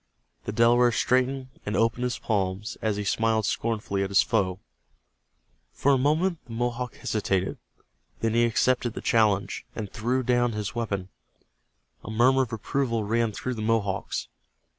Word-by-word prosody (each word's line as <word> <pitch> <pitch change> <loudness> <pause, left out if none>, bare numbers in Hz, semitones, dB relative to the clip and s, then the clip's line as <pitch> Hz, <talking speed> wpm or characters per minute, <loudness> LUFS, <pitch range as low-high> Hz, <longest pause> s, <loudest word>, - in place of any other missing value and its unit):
The - - -2
Delaware 120 +2 +4
straightened 130 +2 +1
and 105 - -2
opened 115 +2 +1
his 125 - -1
palms, 100 0 -2
as 110 -2 0
he 105 - -2
smiled 110 +1 +1
scornfully 110 -3 -1
at 100 - -1
his 100 - +5
foe. 95 -1 0 1.1
For 140 - +2
a 135 - +4
moment 160 +5 +1
the 115 - -8
Mohawk 120 +1 -2
hesitated. 95 -3 -1 0.6
Then 115 -1 0
he 120 +1 +4
accepted 120 +1 +1
the - - -5
challenge, 105 -3 +2
and 105 -3 -5
threw 125 +4 0
down 120 -1 +2
his 105 0 -3
weapon. 100 -6 -3 0.9
A - - -8
murmur 125 +4 +4
of 125 -3 -2
approval 115 0 -1
ran 115 +2 +1
through 125 +4 -4
the 110 - -5
Mohawks. 105 -3 -1
115 Hz, 155 wpm, -26 LUFS, 105-125 Hz, 1.1 s, his